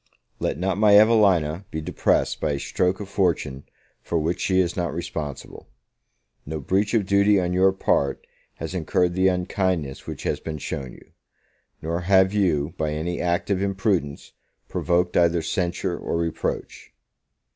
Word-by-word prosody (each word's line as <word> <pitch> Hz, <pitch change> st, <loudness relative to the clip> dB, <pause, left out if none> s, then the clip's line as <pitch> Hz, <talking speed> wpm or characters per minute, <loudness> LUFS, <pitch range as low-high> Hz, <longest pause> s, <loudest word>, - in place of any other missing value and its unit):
LET -, -, -1 dB
not 95 Hz, +2 st, -1 dB
my 105 Hz, -1 st, +7 dB
Evelina 100 Hz, -7 st, +4 dB
be 80 Hz, -, -4 dB
depressed 75 Hz, -, 0 dB
by 75 Hz, -, 0 dB
a 70 Hz, -, -3 dB
stroke 90 Hz, +5 st, 0 dB
of 105 Hz, -, -6 dB
fortune 85 Hz, -9 st, -1 dB, 0.4 s
for 85 Hz, -, -2 dB
which 85 Hz, +3 st, -1 dB
she 95 Hz, -1 st, +2 dB
is 90 Hz, -1 st, +1 dB
not 85 Hz, -2 st, -1 dB
responsible. 80 Hz, -3 st, -6 dB, 0.7 s
No 80 Hz, +2 st, -5 dB
breach 100 Hz, -, 0 dB
of 105 Hz, -4 st, +2 dB
duty 100 Hz, +1 st, +4 dB
on 90 Hz, -1 st, -1 dB
your 95 Hz, +1 st, +4 dB
part 70 Hz, -7 st, 0 dB, 0.3 s
has 80 Hz, +3 st, -6 dB
incurred 90 Hz, 0 st, 0 dB
the 95 Hz, +1 st, +3 dB
unkindness 90 Hz, -5 st, -1 dB
which -, -, -6 dB
has -, -, -1 dB
been 80 Hz, -1 st, -5 dB
shown 70 Hz, -2 st, -5 dB
you; -, -, -17 dB, 0.7 s
nor 85 Hz, +2 st, -2 dB
have 95 Hz, +1 st, +4 dB
you, 85 Hz, -7 st, +1 dB
by 80 Hz, -1 st, 0 dB
any 85 Hz, +3 st, -3 dB
act 90 Hz, +2 st, -1 dB
of 95 Hz, -1 st, +1 dB
imprudence, 95 Hz, -7 st, -1 dB, 0.3 s
provoked 90 Hz, 0 st, 0 dB
either 85 Hz, -1 st, +3 dB
censure 90 Hz, +1 st, -2 dB
or -, -, -2 dB
reproach. 85 Hz, -1 st, -4 dB
90 Hz, 155 wpm, -24 LUFS, 80-95 Hz, 0.7 s, my